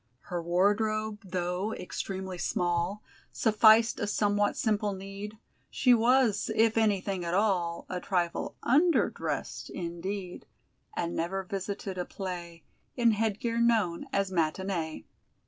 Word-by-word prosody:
Her 175 - 0
wardrobe, 210 +5 +1
though 180 +2 -2
extremely 190 0 -5
small, 175 +4 -1 0.3
Sufficed 220 +1 +5
a 205 - -1
somewhat 205 0 +1
simple 210 -2 +1
need; 195 +2 -7 0.3
She 250 -2 +4
was, 235 -2 +3
if 225 0 +4
anything 200 -4 +1
at 170 +1 -1
all, 185 -5 +1
A 180 - -3
trifle 175 -2 -1
_under_dressed, 315 +7 +1
indeed, 180 +2 -5 0.5
And 170 0 -2
never 190 +3 -2
visited 195 0 -4
a 180 - -1
play 175 -4 -6 0.3
In 235 -2 +4
headgear 225 +2 -1
known 220 -8 +2
as 195 -1 0
"matinée." 170 -1 -1
195 Hz, 115 wpm, -29 LUFS, 180-215 Hz, 0.5 s, Sufficed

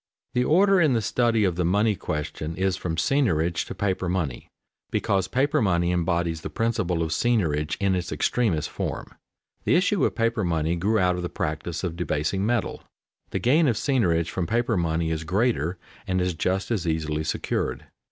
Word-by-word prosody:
_ - - -52
The 125 - +2
order 190 +6 +4
in 155 -5 +4
the 115 - +2
study 115 -1 +2
of 90 -4 +1
the 90 - +1
money 105 +5 +2
question 75 -1 -4
is 95 +1 0
from 85 -3 -3
seigniorage 85 - +1
to - - -6
paper 95 -2 -1
money, 80 -9 -2 0.4
because 95 -2 0
paper 135 +3 +1
money 85 -4 +2
embodies 85 -2 0
the - - -5
principle 95 -7 0
of 80 - -3
seigniorage 80 -9 +1
in 100 -1 +2
its 90 0 -2
extremest 105 -11 0
form. - - -4 0.5
The - - +3
issue - - +2
of - - +1
paper 115 -1 +1
money 80 -1 0
grew 100 +6 +1
out 90 -2 +2
of - - -3
the 90 - -3
practice 80 +3 -3
of 85 -3 -2
debasing 90 +2 -1
metal. 120 0 -1 0.5
The - - -2
gain 150 +6 +3
of 120 - +2
seigniorage 90 - +1
from 90 -3 -2
paper 120 0 +1
money 80 -2 0
is 80 -1 -2
greater 95 - 0 0.3
and 95 0 +1
is 90 0 0
just 95 +5 -1
as 95 -7 -1
easily 80 -1 -1
secured. - - -2
90 Hz, 185 wpm, -25 LUFS, 80-115 Hz, 0.5 s, order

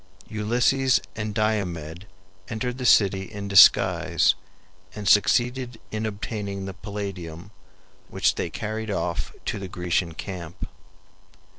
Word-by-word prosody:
Ulysses 120 +5 +2 0.2
and 110 -1 -3
Diomed 95 -5 -2 0.4
entered 125 +3 -3
the 125 - 0
city 95 -2 +4
in 100 -1 -6
disguise 100 -1 +6 0.6
and 105 -2 -5
succeeded 120 +3 +3
in 110 0 -2
obtaining 100 -2 -5
the 95 - -6
Palladium, 95 -3 -7 0.6
which - - +2
they - - -3
carried 110 +1 -4
off 90 -4 -2
to - - -2
the 95 - -6
Grecian 90 -2 -1
camp. 85 -4 -6
100 Hz, 115 wpm, -25 LUFS, 95-110 Hz, 0.6 s, disguise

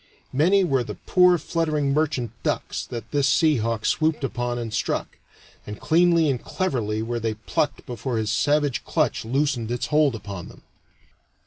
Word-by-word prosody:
Many 180 +8 +4
were 135 -8 +1
the - - -7
poor 180 -1 +4
fluttering 155 -3 -1
merchant 140 -7 0
ducks - - -2
that 115 -2 -7
this 145 -2 +2
sea 150 +2 +3
hawk 115 -1 -2
swooped 155 -2 +1
upon 120 -2 -2
and 115 -2 -5
struck; - - -2 0.5
and 105 0 -7
cleanly 165 0 +3
and 130 -4 -1
cleverly 110 - -2
were 120 +1 -2
they 110 -1 -2
plucked 140 +7 -2
before 125 0 -3
his 110 -1 -1
savage 145 +1 +1
clutch - - 0
loosened 130 -2 0
its 120 +1 -2
hold 150 -5 +4
upon 100 -5 -7
them. - - -15
135 Hz, 160 wpm, -24 LUFS, 115-155 Hz, 0.5 s, Many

